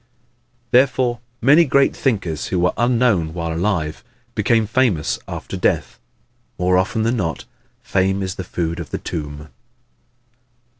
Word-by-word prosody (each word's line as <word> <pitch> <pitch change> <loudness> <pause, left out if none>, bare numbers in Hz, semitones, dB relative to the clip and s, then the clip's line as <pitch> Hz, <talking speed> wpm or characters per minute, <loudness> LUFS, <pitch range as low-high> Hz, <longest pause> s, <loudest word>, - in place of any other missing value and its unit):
Therefore 125 -1 +3 0.2
many 145 +7 +7
great 140 -2 +3
thinkers 95 - -1
who 95 - -1
were 90 +1 +2
unknown 115 -9 +2
while 85 -1 -2
alive 85 -3 -1 0.3
became 110 +1 +2
famous 110 - +1
after - - -6
death. - - 0 0.6
More 90 +1 +2
often 95 +4 +1
than 115 +2 +1
not, 85 -6 -3 0.4
"Fame 95 -3 +1
is 95 -1 -3
the 95 - -6
food 85 -1 -3
of 80 -6 -6
the - - -3
tomb." 75 -1 -6
95 Hz, 135 wpm, -20 LUFS, 85-120 Hz, 0.6 s, many